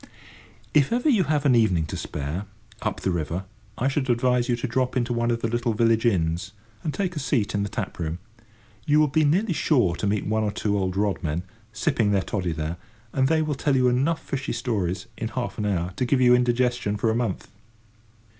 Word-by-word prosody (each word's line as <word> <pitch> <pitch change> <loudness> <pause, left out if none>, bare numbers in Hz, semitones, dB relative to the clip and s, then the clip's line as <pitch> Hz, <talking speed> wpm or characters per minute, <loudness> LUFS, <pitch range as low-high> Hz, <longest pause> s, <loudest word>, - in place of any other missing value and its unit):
If 145 -3 +4
ever 245 +5 +2
you 210 - +4
have 150 -1 0
an 135 - +5
evening 100 -9 +3
to 75 - -6
spare, 75 +7 -4 0.4
up 110 -2 -2
the 95 - 0
river, 85 +2 -2 0.3
I 130 - +1
should 135 -1 -1
advise 125 0 +2
you 120 - +3
to 120 - -4
drop 130 +2 0
into 120 0 0
one 120 0 0
of 115 -1 0
the - - +2
little 120 0 -1
village 115 +1 +3
inns, 90 -1 0 0.3
and 155 - -1
take 185 +1 -2
a - - -2
seat 130 -6 0
in 100 - 0
the 100 - -2
tap 100 -4 -5
room. 80 0 -2 0.7
You 150 +1 +5
will 155 - +5
be 155 +3 +2
nearly 175 +7 +2
sure 125 - +2
to 105 - -1
meet 100 0 0
one 110 +1 +1
or 105 - +1
two 105 0 -1
old 95 -2 -1
rod 100 -3 0
men, 80 +3 -2 0.3
sipping 115 -2 +1
their 100 -2 +2
toddy 90 -5 -2
there, 80 +2 -3 0.4
and 130 -1 +2
they 160 +2 +2
will 155 -1 -1
tell 140 0 0
you 125 -1 +4
enough 140 +7 +1
fishy 140 +1 -3
stories, 95 -7 -2
in 115 - -2
half 120 0 -4
an 105 - 0
hour, 90 -2 -1
to 125 - +1
give 130 +2 +2
you 125 -1 +6
indigestion 125 -3 +1
for 110 +2 +1
a - - -1
month. 115 -5 -2
120 Hz, 220 wpm, -25 LUFS, 100-130 Hz, 0.7 s, you